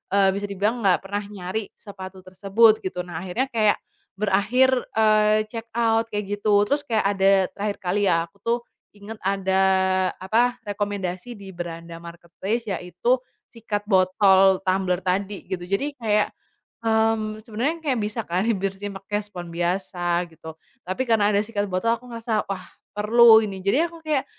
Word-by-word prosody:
eee, 195 -1 +5
bisa 205 +1 -3
dibilang 205 +4 -1
nggak 190 -4 +3
pernah 200 +1 -3
nyari 200 +1 -5
sepatu 190 -2 -10
tersebut, 200 +4 +3
gitu. 180 -1 -4
Nah, 175 -2 -6
akhirnya 190 +8 -2
kayak 215 -3 +3 0.4
berakhir, 215 +6 +2 0.2
eee, 215 -1 +4
check 230 -1 -6
out 230 -1 +2
kayak 205 0 -3
gitu. 210 0 +2
Terus 285 +4 +1
kayak 220 -2 +1
ada 195 0 +4 0.2
terakhir 205 0 -3
kali 195 +3 +1
ya, 165 -2 +3
aku - - -28
tuh 235 +1 +1 0.4
ingat 205 +2 -9
ada 190 0 +1 0.6
apa, 235 +6 +2
rekomendasi 205 +1 -3
di 200 -1 -11
beranda 170 -1 -7
marketplace 175 +6 -5
yaitu 190 +7 0 0.3
sikat 215 -3 -4
botol 190 -1 +4
tumbler 185 -1 +1
tadi, 195 +2 -2
gitu. 180 -2 -4
Jadi, 200 +10 -1
kayak, 210 -2 +1 0.5
mmm, 220 -1 +1
sebenarnya 240 +9 -2
kayak 285 -5 0
bisa 210 +2 -2
kan 180 +3 0 0.2
bersihin 195 +1 -3
pakai 205 +2 -3
spons 180 -4 -9
biasa 175 0 -1
gitu. 160 0 -11 0.3
Tapi 185 +8 -2
karena 210 -2 +3
ada 200 - +3
sikat 205 -2 -2
botol 195 +5 +1
aku 235 - -19
ngerasa, 230 -2 -2
"Wah, 190 -2 -4 0.3
perlu 220 +2 +6
ini." 195 -4 -5
Jadi 200 +7 +2
aku 335 -1 -15
kayak, 295 -3 0
205 Hz, 155 wpm, -23 LUFS, 185-220 Hz, 0.6 s, perlu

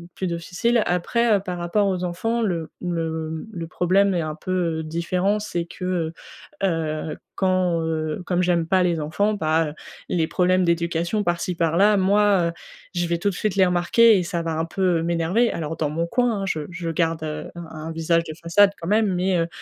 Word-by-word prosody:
plus 190 - -2
difficile. 180 +7 0
Après, 215 +6 +2
heu, - - +2
par 180 -2 -5
rapport 175 +4 +1
aux 185 -2 -1
enfants 225 +7 -1
le 170 -7 -2
le 160 -2 -3
le 170 -5 -6
problème 190 +4 +2
est 175 - 0
un 155 -1 -4
peu 170 -3 -2
différent, 180 +6 0
c'est 175 -5 -3
que, 175 -2 -3 0.5
heu, 160 -4 -1 0.2
quand, 185 -3 +1
heu, 160 +1 -2
comme 180 0 +1
j'aime 175 -2 +2
pas 185 +2 +2
les 170 -3 +1
enfants, 180 +8 0
bah, 160 -5 0 0.3
les 165 -3 +1
problèmes 185 +2 +2
d'éducation 170 +3 0
par-ci, 175 -1 -1
par-là, 170 +6 +3
moi 195 -3 +3 0.4
je 175 -1 0
vais 170 0 0
tout 190 +4 0
de - - -4
suite 210 +1 -1
les 190 - +6
remarquer 185 +5 +4
et 180 - 0
ça 170 0 -2
va 165 0 -3
un 160 - 0
peu 175 0 +1
m'énerver. 170 +8 +1
Alors 160 0 -4
dans 155 -2 -1
mon 165 +3 -2
coin, 235 0 +1
hein, - - -1
je 170 -5 -1
je 170 -1 -4
garde, 165 0 0
heu, 155 -1 -5
un 170 - -7 0.2
un - - -4
visage 165 +1 +1
de 160 - -7
façade 195 +4 +4
quand 165 - -5
même, 210 0 +2
mais, 180 +1 +1
heu, 165 -1 +1
175 Hz, 195 wpm, -23 LUFS, 165-190 Hz, 0.5 s, les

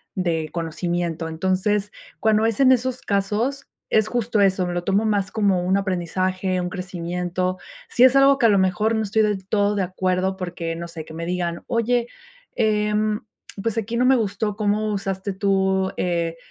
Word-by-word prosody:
de 165 -4 -1
conocimiento, 170 0 -2
entonces, 190 +5 0 0.3
cuando 220 0 +3
es 225 -2 0
en 260 -1 +7
esos 255 +1 -1
casos, 215 +7 -1 0.2
es 215 -1 +2
justo 235 -3 0
eso, 190 -2 +2
me 175 - -3
lo 175 - -2
tomo 200 +4 +1
más 205 -2 0
como 200 -4 +1
un 190 +2 +2
aprendizaje, 185 0 -1
un 180 - -3
crecimiento. 180 0 -3 0.3
Si 245 - +3
es 260 +1 +7
algo 275 0 +6
que 235 - +4
a - - +4
lo 200 -2 +4
mejor 190 +4 +1
no 220 - 0
estoy 215 +2 +1
del 205 -3 -1
todo 205 0 +2
de 200 - +1
acuerdo, 185 +1 -1
porque 175 -3 -4
no 170 +1 -6
sé, 165 -2 -8
que 160 - -11
me 165 +1 -5
digan: 175 -1 -2
"Oye, 235 0 +1 0.5
em, 210 -1 +1 0.4
pues 230 -1 -1
aquí 225 +1 -2
no 250 - +3
me 265 +1 +6
gustó 210 -1 -1
cómo 215 0 0
usaste 195 0 -3
tú, 190 -1 +1
eh, 170 -2 -1
195 Hz, 180 wpm, -22 LUFS, 180-215 Hz, 0.5 s, en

